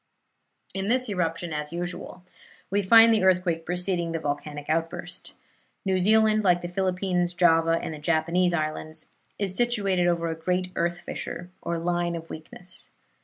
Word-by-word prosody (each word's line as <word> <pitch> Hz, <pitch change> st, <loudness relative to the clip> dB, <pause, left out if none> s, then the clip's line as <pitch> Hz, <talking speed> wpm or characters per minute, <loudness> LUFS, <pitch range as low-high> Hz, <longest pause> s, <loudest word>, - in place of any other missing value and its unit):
In 195 Hz, 0 st, -2 dB
this 255 Hz, +3 st, +2 dB
eruption, 170 Hz, -3 st, -2 dB
as 150 Hz, 0 st, -4 dB
usual, 175 Hz, +1 st, -5 dB, 0.5 s
we 200 Hz, +1 st, +2 dB
find 225 Hz, +3 st, +7 dB
the 215 Hz, -, +2 dB
earthquake 180 Hz, -3 st, +2 dB
preceding 175 Hz, -1 st, -1 dB
the 165 Hz, -, -1 dB
volcanic 145 Hz, 0 st, -4 dB
outburst. 165 Hz, +1 st, -3 dB, 0.5 s
New 190 Hz, -1 st, +2 dB
Zealand, 215 Hz, +2 st, +4 dB
like 175 Hz, -2 st, +3 dB
the -, -, -2 dB
Philippines, 180 Hz, -1 st, 0 dB
Java 165 Hz, -1 st, +4 dB
and -, -, -5 dB
the 155 Hz, -, -8 dB
Japanese 170 Hz, +3 st, +2 dB
Islands, 155 Hz, -1 st, -4 dB, 0.3 s
is 195 Hz, -3 st, -1 dB
situated 200 Hz, -7 st, +1 dB
over 170 Hz, -1 st, +1 dB
a -, -, -3 dB
great 180 Hz, +3 st, -1 dB
earth 175 Hz, +1 st, -1 dB
fissure 175 Hz, +1 st, -6 dB
or 170 Hz, -, -2 dB
line 175 Hz, 0 st, -1 dB
of 165 Hz, 0 st, -8 dB
weakness. 175 Hz, +3 st, -8 dB
175 Hz, 155 wpm, -26 LUFS, 165-185 Hz, 0.5 s, find